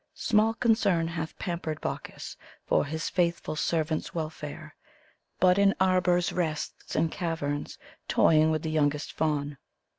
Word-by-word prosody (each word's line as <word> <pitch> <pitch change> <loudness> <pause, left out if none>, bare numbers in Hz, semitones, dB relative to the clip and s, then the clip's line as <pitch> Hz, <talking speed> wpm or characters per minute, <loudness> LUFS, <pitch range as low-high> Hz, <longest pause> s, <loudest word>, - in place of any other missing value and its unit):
Small 220 +1 +2
concern 205 -8 +2
hath 160 -1 -5
pampered 170 -4 -3
Bacchus - - -6 0.3
for - - +2
his 160 +2 -3
faithful 170 -3 0
servant's 155 +1 -1
welfare, 155 -2 -5 0.7
But 185 +1 +5
in 200 0 +4
arbors 180 -2 +2
rests, 160 -4 -3
and 160 0 +1
caverns, 160 -5 -3 0.3
toying 155 0 +4
with 155 -1 0
the 160 - -2
youngest 150 -1 0
Faun. 145 -3 -1
165 Hz, 125 wpm, -28 LUFS, 155-180 Hz, 0.7 s, But